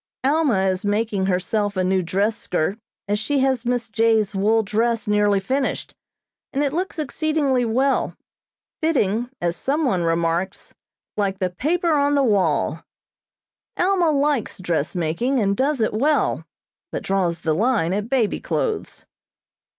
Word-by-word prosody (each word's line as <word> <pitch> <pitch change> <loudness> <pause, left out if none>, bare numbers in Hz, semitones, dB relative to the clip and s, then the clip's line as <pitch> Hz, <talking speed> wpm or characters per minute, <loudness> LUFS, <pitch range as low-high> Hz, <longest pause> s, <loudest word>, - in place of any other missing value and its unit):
Alma 275 -8 +2
is 190 -1 0
making 205 -2 0
herself 200 +2 0
a 185 - +2
new 190 +1 +2
dress 200 +5 0
skirt, 180 +5 -2 0.3
as 205 +1 0
she 280 +7 -1
has 260 -3 0
Miss 245 -2 0
J.'s 220 -1 +2
wool 215 +3 +2
dress 225 +2 0
nearly 205 -1 +3
finished, 265 +8 -2 0.6
and 285 +1 0
it 280 -1 -1
looks 370 +4 -2
exceedingly 300 -4 0
well, 260 +5 +1 0.7
fitting, 245 -7 +1
as 175 0 -1
some 295 - -1
one 190 -9 +1
remarks, 170 +2 -1 0.4
"like 195 -2 0
the 185 -2 -1
paper 335 - 0
on 290 -1 +2
the 280 - +3
wall." 180 - +1 0.9
Alma 360 -2 +2
likes 285 -4 0
dressmaking, 175 - -1
and 200 -2 +1
does 275 +4 0
it 220 - +1
well, 290 +8 +1 0.4
but - - -4
draws 180 -4 0
the 160 -1 +1
line 205 -2 +1
at 210 +3 -2
baby 245 -6 +1
clothes. 440 -3 -3
220 Hz, 145 wpm, -22 LUFS, 190-275 Hz, 0.9 s, nearly